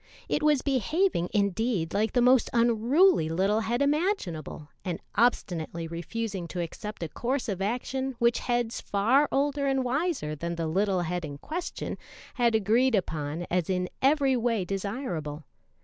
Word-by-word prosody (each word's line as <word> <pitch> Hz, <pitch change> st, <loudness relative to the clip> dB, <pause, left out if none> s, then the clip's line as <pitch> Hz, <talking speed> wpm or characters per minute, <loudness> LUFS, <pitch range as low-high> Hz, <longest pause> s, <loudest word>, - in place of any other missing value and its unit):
It -, -, 0 dB
was 300 Hz, -3 st, +3 dB
behaving, 280 Hz, -, +1 dB
indeed, 200 Hz, -3 st, 0 dB
like 215 Hz, +2 st, +1 dB
the 245 Hz, -, +3 dB
most 250 Hz, 0 st, +5 dB
unruly 235 Hz, -, +4 dB
little 195 Hz, +6 st, +1 dB
head 235 Hz, +4 st, 0 dB
imaginable, 280 Hz, -, -1 dB
and 180 Hz, -2 st, -3 dB
obstinately 170 Hz, -8 st, 0 dB
refusing 190 Hz, +2 st, -4 dB
to 180 Hz, -, -5 dB
accept 175 Hz, +4 st, -5 dB
a 165 Hz, -, -4 dB
course 255 Hz, -, -2 dB
of 195 Hz, -3 st, -3 dB
action 255 Hz, +5 st, -2 dB
which 235 Hz, 0 st, +2 dB
heads 240 Hz, -2 st, -1 dB
far 245 Hz, +9 st, +2 dB
older 280 Hz, 0 st, +1 dB
and 270 Hz, -1 st, +1 dB
wiser 265 Hz, -, -1 dB
than 170 Hz, +3 st, -4 dB
the 165 Hz, -1 st, -2 dB
little 190 Hz, +3 st, +1 dB
head 175 Hz, +1 st, -2 dB
in 145 Hz, -2 st, -6 dB
question 340 Hz, -, -5 dB, 0.3 s
had 235 Hz, -3 st, +2 dB
agreed 225 Hz, +4 st, +3 dB
upon 160 Hz, -3 st, -2 dB
as 180 Hz, -1 st, 0 dB
in 180 Hz, -1 st, 0 dB
every 275 Hz, -1 st, +3 dB
way 230 Hz, -5 st, 0 dB
desirable. 190 Hz, -, -4 dB
220 Hz, 150 wpm, -28 LUFS, 175-260 Hz, 0.3 s, most